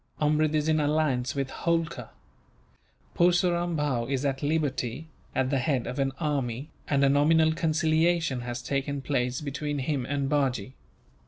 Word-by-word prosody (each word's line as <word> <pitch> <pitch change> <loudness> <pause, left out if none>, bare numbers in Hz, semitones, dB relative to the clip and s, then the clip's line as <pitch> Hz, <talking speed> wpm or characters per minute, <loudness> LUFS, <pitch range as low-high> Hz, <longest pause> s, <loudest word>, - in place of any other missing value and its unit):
Amrud 155 0 +2
is 150 0 +1
in 155 0 +3
alliance 145 -5 +1
with 135 -1 -2
Holkar. 165 -1 -1 1.1
Purseram 175 -1 +2
Bhow 135 -6 0
is 135 0 -1
at 135 -1 -1
liberty, 145 -1 -1 0.3
at 130 0 +1
the 135 - +2
head 130 -2 0
of 130 - -4
an 135 0 +1
army, 140 -4 -2 0.2
and 140 -1 +3
a - - +5
nominal 160 +3 +4
conciliation 160 -3 +1
has 120 0 -5
taken 140 +1 -2
place 125 -2 -1
between 145 0 -3
him 135 -1 -2
and 140 -1 -1
Bajee. 130 -5 0
145 Hz, 150 wpm, -27 LUFS, 130-155 Hz, 1.1 s, a